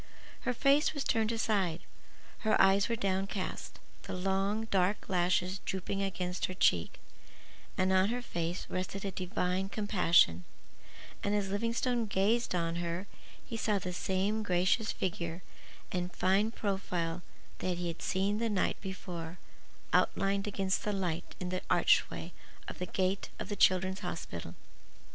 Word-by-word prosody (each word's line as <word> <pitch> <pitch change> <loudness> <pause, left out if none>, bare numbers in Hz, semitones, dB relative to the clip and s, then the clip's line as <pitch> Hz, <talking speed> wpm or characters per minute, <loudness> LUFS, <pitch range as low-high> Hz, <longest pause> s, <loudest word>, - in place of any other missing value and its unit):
Her - - +2
face 280 +5 +4
was 285 - -1
turned 225 -1 +1
aside, 200 -7 0 0.6
her 220 -1 +2
eyes 195 +2 +5
were 230 - +1
downcast, 195 -1 -2 0.2
the - - -6
long, 195 +4 0
dark 190 +1 +2
lashes 180 +1 +1
drooping 190 +1 -3
against 180 -2 -1
her 185 - -6
cheek, 85 - +2 0.8
and 185 0 +3
on 190 +2 +4
her 245 +1 -2
face 170 -4 -3
rested 190 +2 -3
a 195 - -1
divine 185 0 -1
compassion; 175 - +3 0.8
and 205 +1 +1
as 200 -2 0
Livingstone 230 +2 0
gazed 205 +2 +2
on 165 -1 0
her 175 +2 -2 0.4
he 230 - -6
saw 215 -2 +1
the 180 -1 -4
same 195 +4 0
gracious 185 +3 +2
figure 170 -1 -3 0.5
and 180 0 -2
fine 195 +5 +2
profile 180 -6 -2 0.4
that 180 -1 -1
he 175 0 -2
had 165 0 -5
seen 200 +3 0
the 230 0 0
night 200 -3 0
before 180 -3 -6 0.6
outlined 195 +1 +2
against 195 -2 0
the 210 - 0
light 180 -3 -2
in 180 - -3
the 185 0 -2
archway - - +3 0.3
of - - -7
the 180 - -3
gate 190 +2 0
of - - -6
the 205 - -2
Children's 190 0 +3
Hospital. 85 - -5
190 Hz, 145 wpm, -32 LUFS, 180-205 Hz, 0.8 s, eyes